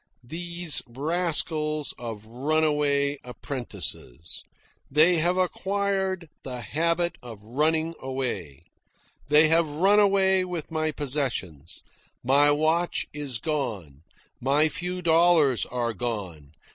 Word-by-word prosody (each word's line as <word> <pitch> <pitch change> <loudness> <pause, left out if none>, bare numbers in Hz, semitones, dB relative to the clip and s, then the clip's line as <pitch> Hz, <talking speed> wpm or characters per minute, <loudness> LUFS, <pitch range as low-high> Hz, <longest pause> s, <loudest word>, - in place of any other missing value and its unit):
Those 170 +4 -3
rascals 155 +2 0
of 115 -3 -7
runaway 145 +2 0
apprentices! 120 - -6 0.5
They 160 +5 +6
have 175 +3 +2
acquired 190 -1 -1
the 125 -2 -6
habit 170 +7 0
of 115 -4 -10
running 155 +7 0
away. 125 - -4 0.6
They 150 +2 +6
have 165 0 +3
run 190 +8 +3
away 190 -2 +3
with 175 -3 -6
my 155 -1 -1
possessions. 125 - -3 0.4
My 140 +3 +5
watch 160 +4 +1
is 145 -5 -4
gone. 110 - -4 0.4
My 145 +5 +3
few 180 +2 -4
dollars 165 - +4
are 120 -2 -2
gone. 95 - -5
150 Hz, 105 wpm, -25 LUFS, 125-170 Hz, 0.6 s, They